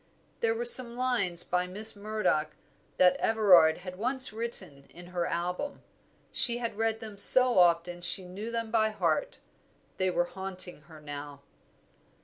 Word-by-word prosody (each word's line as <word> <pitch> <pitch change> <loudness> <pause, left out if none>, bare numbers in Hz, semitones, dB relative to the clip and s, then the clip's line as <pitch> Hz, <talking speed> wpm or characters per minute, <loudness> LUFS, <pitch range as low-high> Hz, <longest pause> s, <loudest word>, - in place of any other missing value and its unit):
There 460 -1 0
were 475 +1 -4
some 255 - +3
lines 235 -9 -1
by 180 0 -2
Miss 210 +4 -2
Murdoch 200 -7 -2 0.4
that 180 0 +4
Everard 180 -8 +4
had 185 0 -9
once 255 0 +3
written 190 -11 -6
in 175 +1 -13
her 175 -1 -2
album. 180 +12 -4 0.5
She 235 -1 0
had 235 -3 -5
read 225 0 -1
them 215 -3 -8
so 255 0 +7
often 175 0 +2
that 175 - -15
she 185 +1 +3
knew 195 +5 -8
them 230 -1 -4
by 220 -1 +2
heart; 215 - -2 0.6
they 185 0 0
were 175 -1 0
haunting 185 -2 -6
her 160 -1 -13
now. 145 -1 -9
195 Hz, 155 wpm, -28 LUFS, 175-230 Hz, 0.6 s, so